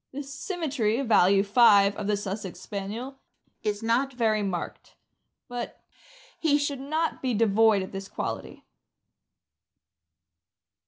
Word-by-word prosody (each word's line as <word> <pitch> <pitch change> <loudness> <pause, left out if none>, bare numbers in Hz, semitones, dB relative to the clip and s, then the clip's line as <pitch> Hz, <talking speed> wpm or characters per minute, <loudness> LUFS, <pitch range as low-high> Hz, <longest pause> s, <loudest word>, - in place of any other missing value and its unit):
The 285 +2 -5
symmetry 280 - -2
(value 200 -5 +4
5) 205 -2 +5
of 200 - -4
the 210 -1 +1
Sussex 195 -2 -5
Spaniel 215 +8 -6 0.4
is 210 0 -2
riot 250 +4 +1
very 220 -3 +1
marked; 190 -4 -5 0.5
but 245 -2 -6 0.6
he 300 -3 +3
should 285 -2 -2
not 310 +4 -2
be 255 -3 0
devoid 220 -1 +4
of 190 - -8
this 195 0 -6
quality. - - -6
225 Hz, 115 wpm, -27 LUFS, 200-270 Hz, 0.6 s, 5